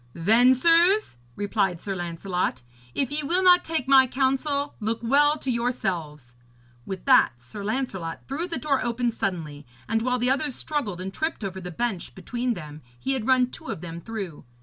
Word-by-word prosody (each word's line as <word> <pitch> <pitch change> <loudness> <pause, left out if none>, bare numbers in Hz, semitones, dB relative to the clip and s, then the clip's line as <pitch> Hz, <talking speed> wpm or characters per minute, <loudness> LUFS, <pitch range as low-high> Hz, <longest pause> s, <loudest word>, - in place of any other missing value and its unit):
'Then, 225 +9 +5
sirs,' 340 - +3 0.2
replied 200 -4 0
Sir 195 +2 -4
Lancelot, 175 -5 -2 0.3
'if 270 -2 0
ye 300 +1 +1
will 350 +6 +1
not 360 -1 +6
take 320 -6 -2
my 265 -1 +7
counsel, 275 +3 0
look 220 +1 -1
well 290 +5 +4
to 270 -3 -3
yourselves.' 175 - -2 0.5
With 190 -1 -6
that 255 - +5
Sir 125 - -9
Lancelot 200 -7 -3
threw 305 +7 -3
the 335 - -3
door 280 -3 0
open 240 0 0
suddenly, 160 -9 -3 0.2
and 225 0 0
while 250 +1 +1
the 250 +1 +2
others 275 -1 0
struggled 250 - -2
and 190 +1 -5
tripped 315 -4 -3
over 190 -1 -4
the 180 - -6
bench 200 0 -3
between 245 0 -2
them 150 -3 -9 0.2
he 270 - -1
had 250 -5 -3
run 255 -1 +3
two - - -9
of - - -5
them 170 -1 -7
through. 195 -7 -6
235 Hz, 180 wpm, -25 LUFS, 185-275 Hz, 0.5 s, my